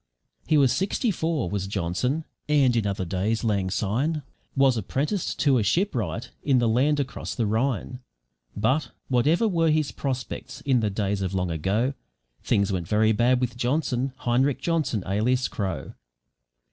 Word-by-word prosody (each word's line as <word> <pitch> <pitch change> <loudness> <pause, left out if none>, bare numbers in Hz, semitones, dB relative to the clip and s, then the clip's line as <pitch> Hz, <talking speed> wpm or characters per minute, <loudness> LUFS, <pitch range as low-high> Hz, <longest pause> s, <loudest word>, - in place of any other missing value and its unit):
He 155 - +4
was 135 -4 +5
sixty 195 - 0
four 160 - -1
was 95 +1 -2
Johnson, 100 - -1 0.2
and 140 -5 +4
in 110 -3 +1
other 95 -2 -2
days, 100 +5 -1
lang 100 -4 +1
syne, 125 - -1 0.3
was 135 -2 +4
apprenticed 140 - -2
to 135 -4 +4
a - - +1
ship 180 - +1
wright 115 - -3
in 135 -3 +2
the 120 -1 +3
land 135 +6 +2
across 135 -2 -4
the 115 - 0
Rhine; 120 +2 -1 0.6
but, 120 +6 +1 0.2
whatever 150 - +3
were 165 -5 +2
his 155 -1 +1
prospects 130 -2 -5
in 135 -3 +2
the 110 -2 0
days 100 0 -1
of 95 0 -2
long 90 -2 0
ago, 100 - 0 0.5
things 100 0 +1
went 90 -4 -2
very 110 +3 +3
bad 120 +3 +3
with 125 -1 -2
Johnson 130 +1 0
Heinrich 130 +3 +1
Johnson 155 - 0
(alias 120 +6 +1
Crow). 95 -9 -4
120 Hz, 160 wpm, -25 LUFS, 100-140 Hz, 0.6 s, was